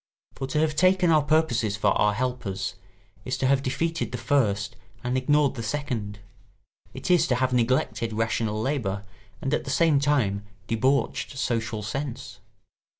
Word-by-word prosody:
For 135 - -5
to 145 - -2
have 155 -1 +1
taken 185 +1 +4
our 155 -1 +5
purposes 140 -9 +1
for 105 -1 +2
our 105 +1 +2
helpers 125 -6 -2 0.5
is 130 - -2
to - - -1
have 135 0 +3
defeated 165 +5 -2
the 125 - -3
first 115 -5 +1 0.3
and 125 +1 -1
ignored 145 +2 +3
the 125 - -5
second; 115 -4 -3 0.7
it - - -3
is 175 -2 +4
to 125 - +2
have 130 0 0
neglected 120 -1 +1
rational 110 -1 -1
labour 110 -6 -2 0.4
and 135 - -1
at - - +1
the - - -7
same 160 -4 +3
time 125 -9 +1 0.2
debauched 130 +3 0
social 115 -4 -1
sense. 130 +4 -5
130 Hz, 155 wpm, -26 LUFS, 110-145 Hz, 0.7 s, our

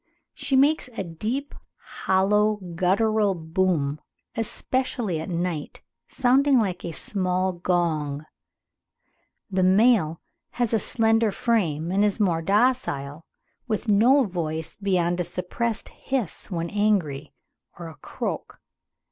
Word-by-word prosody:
She 270 - -1
makes 285 +3 +3
a - - -1
deep 220 - -4 0.2
hollow 210 +3 +1 0.2
guttural 200 +3 +2
boom 160 -3 -1 0.3
especially 225 -5 -1
at 160 - -6
night, 170 -3 -3 0.2
sounding 270 +2 +3
like 190 -6 0
a 170 - -4
small 185 +1 -1
gong. 160 -5 -1 1.3
The 190 0 +1
male 190 -3 +4 0.3
has 240 -2 -1
a 225 - +3
slenderer 225 0 +2
frame 175 -9 0
and 195 +2 +2
is 210 -1 +1
more 175 -6 +2
docile, 165 - 0 0.4
with 225 +1 -2
no 245 +7 +5
voice 165 -5 -4
beyond 180 -3 0
a - - +1
suppressed 185 +6 -3
hiss 255 -10 -4
when 170 -3 -3
angry, 185 -9 0 0.5
or 170 -1 -7
a 165 - -9
croak." - - -5
190 Hz, 115 wpm, -25 LUFS, 165-225 Hz, 1.3 s, no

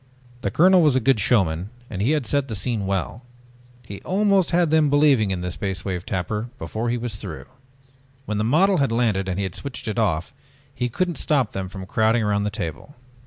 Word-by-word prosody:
The 100 - -1
colonel 180 - +5
was 150 -5 +4
a - - +4
good 130 -1 +2
showman 95 -5 +1 0.2
and 100 -5 -5
he 125 +9 +2
had 150 -5 0
set 140 +4 0
the 110 - -4
scene 105 -1 -2
well. 100 +4 -2 0.6
He 100 -2 -8
almost 195 -1 +2
had 170 -2 +2
them 155 -2 +4
believing 140 -7 +4
in 95 -2 -2
the 90 0 -3
Space 95 +1 -4
Wave 90 -2 -4
Tapper 105 +5 -3
before 115 0 -3
he 120 - 0
was 115 -3 -3
through. 95 -6 -7 0.8
When 105 -1 -2
the - - +1
model 180 - +3
had 140 -4 +1
landed 110 -5 +1
and 90 - -2
he 100 - -1
had 95 -3 -3
switched 135 -3 -7
it 110 +2 -2
off 90 -6 0 0.4
he 125 -2 -2
couldn't 175 +7 -2
stop 140 -8 +1
them 95 -1 -4
from 95 -1 -8
crowding 110 +4 +2
around 105 -1 0
the - - 0
table. 100 - -6
110 Hz, 215 wpm, -23 LUFS, 95-140 Hz, 0.8 s, colonel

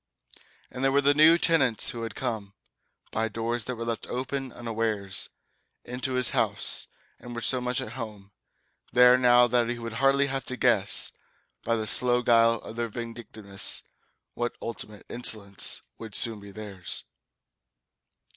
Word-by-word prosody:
And 130 - -6
there 135 - +3
were 140 - +3
the 140 0 +4
new 155 +3 +6
tenants 140 -10 +3
who 120 - -7
had 115 - -6
come, 110 -6 -4 0.6
By 110 +1 -1
doors 115 +1 -3
that 125 - -4
were 115 0 -6
left 115 -1 -4
open 130 +1 -4
unawares, 110 -5 -3 0.6
Into 125 +2 -4
his 125 -2 +2
house, - - 0 0.3
and 120 -1 -9
were 115 - -4
so 125 +2 +1
much 125 +1 -1
at 130 - -6
home 105 -5 -8 0.6
There 125 0 +7
now 125 -1 +5
that 120 -1 +1
he 120 - -3
would 115 -1 -6
hardly 135 +1 +4
have 135 -1 -3
to 125 - -5
guess, 110 -7 +4 0.5
By 115 - 0
the 110 -1 -2
slow 125 +2 +3
guile 115 -1 +4
of 115 - -10
their 120 0 -1
vindictiveness, 110 -3 0 0.5
What 120 0 -3
ultimate 105 -2 -7
insolence 105 -5 -1 0.2
would 110 -3 -8
soon 115 -2 0
be 100 0 -12
theirs. 100 -3 -5
120 Hz, 155 wpm, -27 LUFS, 110-125 Hz, 0.6 s, There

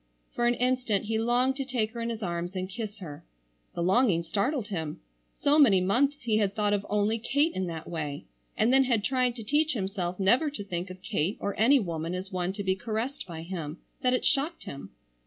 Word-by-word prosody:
For 240 - +1
an 240 - +3
instant 250 -5 +1
he 220 +1 0
longed 245 +3 +2
to 275 - -1
take 245 -5 -1
her 235 0 -6
in 230 - -2
his 225 -2 -4
arms 175 +1 -3
and 185 0 -2
kiss 215 +1 -6
her. 150 -5 -8 0.5
The 170 - -1
longing 190 -2 +3
startled 215 - -1
him. 160 -6 -4 0.4
So 290 +2 +4
many 215 -10 +7
months 260 +10 +1
he 220 -3 +2
had 200 -2 +1
thought 210 -1 +1
of 200 -1 0
only 210 +2 +1
Kate 285 +8 +1
in 185 -1 -2
that 165 -2 -6
way, 150 -4 -4 0.3
and 235 +4 +3
then 270 0 +6
had 235 -5 +1
tried 255 -1 +1
to 230 - -7
teach 300 +7 +2
himself 190 -4 -3
never 245 +11 +4
to 280 -8 -6
think 180 -1 -4
of 185 0 -10
Kate 175 +3 -1
or 200 - -2
any 265 +6 +5
woman 170 -3 -3
as 190 +2 -6
one 180 0 -1
to 200 0 -4
be 190 -1 +1
caressed 225 +7 -3
by 165 -2 -7
him, 165 -3 -5 0.2
that 255 0 +3
it - - -2
shocked 295 +5 0
him. 135 -9 -8
210 Hz, 220 wpm, -28 LUFS, 185-250 Hz, 0.5 s, many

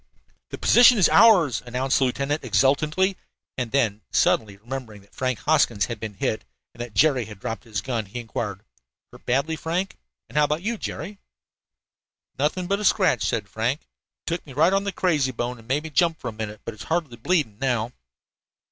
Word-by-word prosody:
"The - - -6
position 245 0 +6
is 190 - +6
ours," 170 - +5
announced 125 +2 0
the 135 - +3
lieutenant 140 +4 -1
exultantly, 155 +8 +2 0.4
and 125 -3 -3
then, 110 -6 +1
suddenly 100 -3 +1
remembering 115 -1 -7
that 100 - -26
Frank 130 -2 -1
Hoskins 140 -9 +2
had 120 -3 -6
been 110 -2 -6
hit 110 +2 -2 0.3
and 120 - -9
that 120 -4 -7
Jerry 135 -1 +3
had 105 -1 -11
dropped 115 +5 -5
his 105 -4 -3
gun, 115 -4 -3
he 110 +6 -6
inquired: 105 -3 -5 0.5
"Hurt - - -17
badly, 140 +6 +1
Frank? 175 +5 -3 0.3
And 150 - -1
how 150 - +5
about 150 +4 -2
you, 225 +1 -2
Jerry?" 195 +6 -6 1.2
"Nothing 155 +6 0
but 200 +2 0
a - - -4
scratch," 190 -4 +3
said 110 -3 -1
Frank. 115 +8 -1 0.4
"Took 170 0 -2
me 135 - -10
right 160 +7 +3
on 195 +1 +1
the 200 - -1
'crazy 155 -9 +1
bone' 120 0 -4
and 115 - -17
made 140 +4 0
me 160 - -7
jump 165 +2 +2
for 125 - -4
a - - -8
minute, 105 -1 -6
but 115 - -5
it's 105 - -10
hardly 160 -7 -2
bleeding 120 - 0
now." 120 -3 0
130 Hz, 190 wpm, -24 LUFS, 115-160 Hz, 1.2 s, position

